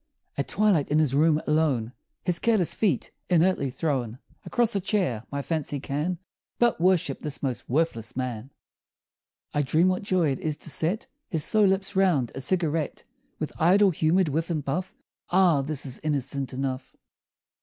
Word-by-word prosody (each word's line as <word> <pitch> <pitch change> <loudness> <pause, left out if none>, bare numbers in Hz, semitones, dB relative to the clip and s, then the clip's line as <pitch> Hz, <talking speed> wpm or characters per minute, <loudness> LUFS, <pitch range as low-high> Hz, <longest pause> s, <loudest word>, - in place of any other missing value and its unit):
At 140 - -2
twilight, 195 -8 +2
in 150 - +2
his 155 -4 +2
room, 155 +2 +4
alone, 145 -7 +1 0.3
His 175 -1 0
careless 220 -7 +2
feet 185 - 0 0.2
inertly 175 -5 +3
thrown 130 -5 -2 0.3
Across 235 -3 +1
a 200 - +1
chair, 180 - -1
my 140 0 -3
fancy 150 -3 -2
can 150 +6 -2 0.4
But 240 -8 +2
worship 175 -6 +2
this 150 -2 -4
most 130 -3 -3
worthless 125 -6 -1
man! 125 -1 -3 1.0
I 145 - +2
dream 160 +6 +3
what 185 - 0
joy 185 -7 +1
it 135 - -3
is 155 -2 -2
to 160 - -6
set 170 - -1 0.2
His 160 -7 -1
slow 215 -1 +4
lips 195 +1 0
round 175 -11 +2
a 135 - -5
cigarette, 160 0 -1 0.3
With 155 - -4
idle 190 +4 +5
humored 165 +2 +2
whiff 160 +4 -1
and 155 -4 -2
puff 180 +7 -3 0.3
Ah! 175 -5 +4
this 145 0 -2
is 130 -2 -5
innocent 140 -3 -1
enough! 130 0 -4
155 Hz, 165 wpm, -26 LUFS, 135-185 Hz, 1.0 s, idle